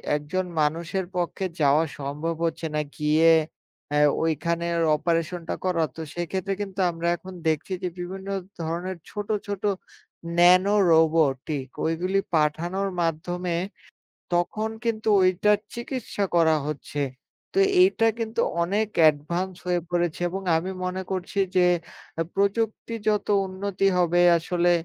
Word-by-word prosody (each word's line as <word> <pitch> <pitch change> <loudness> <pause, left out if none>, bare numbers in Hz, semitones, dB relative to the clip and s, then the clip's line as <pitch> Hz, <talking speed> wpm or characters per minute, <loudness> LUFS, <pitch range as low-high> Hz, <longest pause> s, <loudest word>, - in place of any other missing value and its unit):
একজন 150 +6 -2 0.2
মানুষের 165 +5 -1
পক্ষে 180 +2 -2 0.2
যাওয়া 145 +3 +4 0.2
সম্ভব 150 +4 -3
হচ্ছে 165 0 -2
না, 150 - +2 0.2
গিয়ে 155 +2 +4 0.6
আ - - +3 0.3
ঐখানে 170 +2 0 0.3
অপারেশন 165 +2 -1
টা - - 0
করা। 175 -3 +2
তো 160 - -6
সেক্ষেত্রে 185 +3 -2
কিন্তু 195 -1 -5
আমরা 170 0 -3
এখন 185 +2 -11
দেখছি 160 +4 0
যে - - +1
বিভিন্ন 190 +2 -6 0.3
ধরনের 170 +3 -3
ছোট, 205 -1 -5 0.2
ছোট 200 -1 -4 0.7
ন্যানো 185 +3 +6 0.2
রোবটিক 155 -4 +2 0.2
ঐগুলি 180 +4 0 0.2
পাঠানোর 170 +6 0
মাধ্যমে 170 +2 -2 0.8
তখন 215 +5 0
কিন্তু 220 -1 -1
ওইটার 195 +3 +3 0.2
চিকিৎসা 235 -4 -3
করা 160 -2 +5
হচ্ছে। 150 0 -5 0.5
তো 390 - -1 0.2
এইটা 370 -12 +4
কিন্তু 225 0 -2 0.2
অনেক 205 +5 0
অ্যাডভান্স 160 +5 +2
হয়ে 180 -1 +1
পড়েছে 175 -1 0
এবং 190 +2 -5
আমি 180 +4 -2
মনে 185 +1 -2
করছি 190 +1 -3 0.2
যে 180 - +5 0.7
প্রযুক্তি 220 +3 0
যত 210 -1 +1 0.2
উন্নতি 195 +1 -2
হবে, 175 0 +3 0.2
আসলে 175 +1 +1
175 Hz, 125 wpm, -25 LUFS, 160-195 Hz, 0.8 s, ন্যানো